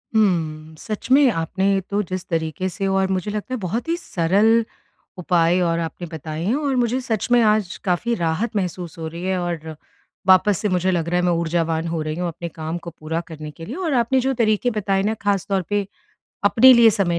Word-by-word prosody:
हुँ, 160 -7 0
सच 215 +3 -6
में 275 -1 +6
आपने 190 +3 0
तो 205 +1 0
जिस 185 -1 -5
तरीके 165 +2 -2
से 195 +1 -3
और 190 0 +2
मुझे 190 +2 -1
लगता 210 +4 -4
है 255 - -1
बहुत 215 - -3
ही 335 - +2
सरल 215 - +2 0.5
उपाय 175 0 +2
और 170 -1 +1
आपने 170 +1 -5
बताए 155 +1 -5
हैं। 220 +8 +1
और 285 -3 -1
मुझे 245 +1 +1
सच 225 -4 -2
में 245 - +6
आज 210 -4 +2
काफ़ी 185 +6 0
राहत 175 +6 -1
महसूस 180 -3 -3
हो 160 -1 -5
रही 170 +2 -7
है 190 0 0
और 165 -3 -4 0.5
वापस 190 +1 +5
से 210 - -1
मुझे 185 +1 +1
लग 170 -2 -1
रहा 175 - +1
है, - - 0
मैं 175 - +3
ऊर्जावान 165 -1 0
हो 165 -1 -2
रही 155 0 -3
हूँ 175 +1 -2
अपने 170 0 -6
काम 160 +1 -5
को 170 0 -8
पूरा 160 +2 -3
करने 155 -2 -8
के 165 +3 -10
लिए 240 - -6
और 340 -5 -2
आपने 250 +2 +2
जो 265 +1 0
तरीके 230 0 +1
बताए 195 -2 0
ना 215 +2 +1
ख़ास 200 -2 0
तौर 195 -1 +1
पे 205 -1 0 0.6
अपने 225 +6 +7
लिए 235 -2 +7
समय 175 -4 0
185 Hz, 215 wpm, -21 LUFS, 165-215 Hz, 0.6 s, अपने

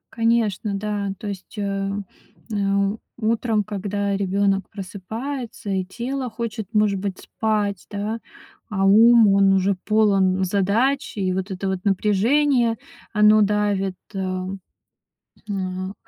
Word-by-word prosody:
Конечно, 225 -3 +1
да. 205 -1 -2
То 210 - -7
есть, 200 +2 -7
э, 195 -1 -2 0.6
э, - - -2 0.6
утром, 225 -1 +1
когда 200 0 -2
ребёнок 195 0 0
просыпается 220 +5 -6
и 190 -1 0
тело 250 +6 -4
хочет, 225 -2 -5
может 210 -2 +2
быть, 195 -1 -4
спать, 210 -3 -2
да, 210 +3 -3 0.5
а 195 -2 0
ум, 225 +3 +7
он 195 0 +5
уже 195 +1 +2
полон 195 -3 +3
задач, 210 +9 +1
и 185 -2 0
вот 190 +1 -3
это 190 +1 -3
вот 190 -1 -1
напряжение, 230 +5 +2 0.4
оно 210 0 +6
давит, 205 -2 +1 0.2
а. 185 -1 -2 1.0
М, 185 -1 -3
205 Hz, 120 wpm, -22 LUFS, 195-220 Hz, 1.0 s, ум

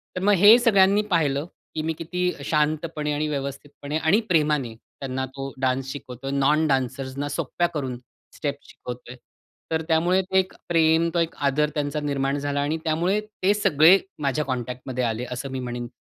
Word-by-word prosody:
तर 180 - -3
मग 205 +1 +5
हे 205 +6 +9
सगळ्यांनी 200 -4 +4
पाहिलं 145 -4 +1 0.3
की 155 - -1
मी 160 +1 -1
किती 180 +2 -1
शांतपणे 150 0 0
आणि 150 +1 -1
व्यवस्थितपणे 145 +1 -4
आणि 160 +6 +3
प्रेमाने 150 -7 +1
त्यांना 130 +3 -6
तो 135 0 -5
डान्स 130 0 0
शिकवतोय. 135 -1 -7
नॉन 150 +3 +2
डान्सर्सना 135 +1 -2
सोप्या 165 +3 -1
करून 130 -4 -3 0.4
स्टेप्स 145 -1 -4
शिकवतोय. 125 0 -9 0.6
तर 160 0 +1
त्यामुळे 175 +4 +3
ते 190 0 +1
एक 185 - -2 0.2
प्रेम, 165 0 +3
तो - - +3
एक 165 -1 -1
आदर 150 +2 +1
त्यांचा 145 0 -1
निर्माण 140 -1 -1
झाला 145 0 -1
आणि 150 +3 -1
त्यामुळे 170 +6 +1
ते 210 -2 0
सगळे 170 -3 +5 0.2
माझ्या 145 +2 0
कॉन्टॅक्टमध्ये 125 0 -3
आले 115 +1 -2
असं 125 +2 -5
मी 130 - -3
म्हणेन. 120 -1 -4
150 Hz, 165 wpm, -24 LUFS, 135-165 Hz, 0.6 s, हे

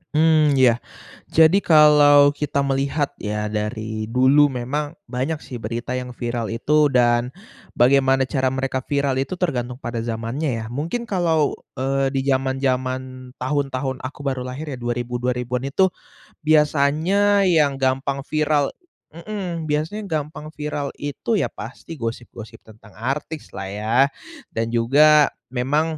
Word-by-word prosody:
Mmm, 155 -2 +4
ya, 125 -3 +4 0.5
jadi 160 +3 +5
kalau 150 -4 +6
kita 145 -1 -1
melihat 140 +2 0
ya 105 0 -3
dari 110 0 -3
dulu 130 +5 +4
memang 145 +4 -3
banyak 135 -1 -2
sih 125 - -7
berita 115 +2 -5
yang 125 -1 -8
viral 120 -1 -3
itu 150 +6 +2
dan 120 -2 +2 0.5
bagaimana 135 +1 +4
cara 130 0 0
mereka 130 0 -1
viral 140 0 -1
itu 135 +7 -2
tergantung 125 -9 -2
pada 120 -3 -5
zamannya, 115 +6 -3
ya. - - -7
Mungkin 165 - -3
kalau, 165 -6 +1 0.2
eee, 135 +1 0
di 135 - +1
zaman-zaman 130 -1 -1
tahun-tahun 130 -1 -2
aku 130 +3 -8
baru 135 -2 -2
lahir 145 +4 -6
ya, 130 - -6
dua 120 0 -2
ribu 120 0 -3
dua 125 0 -1
ribuan 125 +2 -3
itu, 190 +6 +2 0.5
biasanya 155 +7 +3
yang 150 -5 +2
gampang 135 +1 0
viral 150 -2 +1 0.5
mhm, 175 -3 -5
biasanya 160 +9 -2
gampang 155 -1 -4
viral 150 -2 -4
itu 145 +9 -2
ya - - +1
pasti 125 +9 -9
gosip-gosip 115 -1 -7
tentang 110 -1 -17
artis 140 +6 -4
lah 95 - -5
ya, 105 +3 -2 0.6
dan 115 0 -1
juga 145 +6 +4 0.2
memang, 150 +6 0
135 Hz, 140 wpm, -22 LUFS, 125-150 Hz, 0.6 s, kalau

